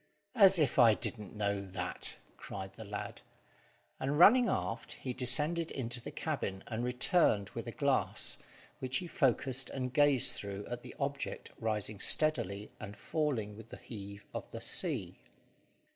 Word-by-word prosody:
"As 195 -6 +7
if 145 -5 +2
I 115 -3 +7
didn't 105 -2 -3
know 100 -1 -1
that," 95 -1 -2 0.2
cried 95 -1 -7
the 110 - -9
lad; 105 0 -6 0.8
and, 140 +2 -1
running 235 +8 +7
aft, 95 +6 -2
he 130 - -5
descended 150 +7 +3
into 120 -2 -3
the - - -7
cabin, 95 0 -3
and 115 0 -4
returned 125 - +2
with - - -6
a - - -3
glass, - - +2 0.4
which 130 +1 0
he 180 - -4
focussed 135 -4 0
and 125 -2 -4
gazed 145 -4 +5
through 100 0 -5
at 120 0 -5
the - - -11
object 140 0 -4
rising 110 -2 -2
steadily 105 -9 +1
and 105 -1 -8
falling 120 -6 -2
with 110 +1 -12
the - - -8
heave 100 -2 -9
of - - -6
the - - -7
sea. - - -1
120 Hz, 155 wpm, -33 LUFS, 105-140 Hz, 0.8 s, As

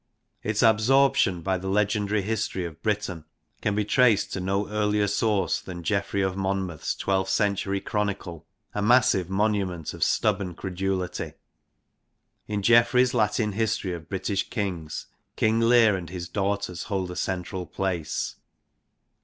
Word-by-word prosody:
Its 105 +1 0
absorption 110 -5 +4
by 95 0 0
the 95 - -6
legendary 105 0 +1
history 105 -3 -2
of: 80 -1 -9
Britain 100 -6 -2 0.4
can 105 -1 0
be 105 0 0
traced 115 -1 +3
to - - -2
no 95 +2 -1
earlier 105 0 +1
source 105 0 +1
than 90 -2 -8
Geoffrey 100 +1 0
of 95 -1 -1
Monmouth's 95 -4 -2
twelfth 95 -1 0
century 100 -1 +1
chronicle, 100 -6 -3 0.3
a 105 - -2
massive 105 -5 +4
monument 95 -5 -1
of - - -2
stubborn 95 -4 +1
credulity. 95 0 -3 1.1
In 105 -1 -2
Geoffrey's 120 +3 +5
Latin 105 -1 +1
history 105 -3 -1
of 80 -2 -8
British 95 +1 -2
Kings, 90 -8 -3 0.3
King 110 +1 +2
Lear 115 -2 +5
and 90 -4 -6
his 90 -1 -6
daughters 100 -1 -2
hold 95 -4 -2
a - - -7
central 90 0 -3
place. 90 -5 -2
100 Hz, 135 wpm, -26 LUFS, 95-105 Hz, 1.1 s, Geoffrey's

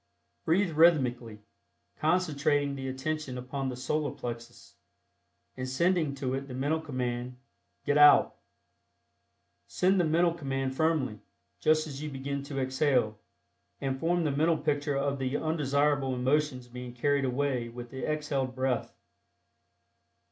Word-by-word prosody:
Breathe 175 +2 +2
rhythmically, 125 -9 +2 0.6
concentrating 150 -4 +1
the 135 -1 -5
attention 130 0 -3
upon 130 +2 -3
the 125 - -4
Solar 150 +4 -1
Plexus, 120 0 -8 0.8
and 130 0 -4
sending 160 +1 +1
to 130 -2 -3
it 135 +1 -3
the 125 - -7
mental 145 +5 0
command 125 -4 -3 0.5
"Get 145 +1 +3
Out." 145 0 +7 1.3
Send 190 +1 +2
the - - +4
mental 170 +2 +3
command 135 -4 -3
firmly, 150 -8 0 0.4
just 155 0 +3
as 145 -2 -7
you 150 - -4
begin 140 0 -4
to 140 -1 -4
exhale, 130 -5 +1 0.6
and 135 -1 -2
form 175 +3 +1
the 150 - +1
mental 160 +4 +2
picture 145 -1 -1
of 140 0 -1
the 130 +1 -1
undesirable 145 -3 +1
emotions 130 0 0
being 125 0 -8
carried 140 +3 +1
away 130 -2 -1
with 120 0 -9
the 130 - -6
exhaled 140 -4 -2
breath. 130 -2 -1
140 Hz, 135 wpm, -29 LUFS, 130-155 Hz, 1.3 s, Out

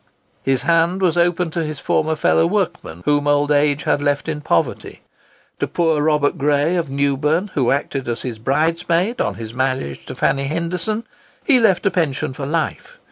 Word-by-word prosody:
His 135 -2 0
hand 170 +4 +2
was 180 -4 +2
open 175 -1 +1
to 165 0 -2
his 155 -2 -5
former 155 +3 0
fellow 80 - +3
workmen 85 +1 -2
whom 145 0 +2
old 145 0 +2
age 145 0 +2
had 145 - +1
left 145 +1 0
in 155 -2 -3
poverty. 85 - -1 0.6
To - - 0
poor 160 -3 +1
Robert 150 -1 +1
Gray, 145 +4 +2
of 170 -5 -1
Newburn, 140 +7 0
who 130 -4 +1
acted 135 -1 -1
as 120 0 -3
his 120 -4 -5
bridesman 165 - 0
on - - -1
his 115 0 -8
marriage 130 - -2
to - - -6
Fanny 140 0 +1
Henderson, 170 +8 -2 0.4
he 270 -6 +5
left 205 -6 +3
a 200 - +3
pension 150 -7 -1
for 135 +1 -5
life. 165 - -3
150 Hz, 180 wpm, -20 LUFS, 135-170 Hz, 0.6 s, he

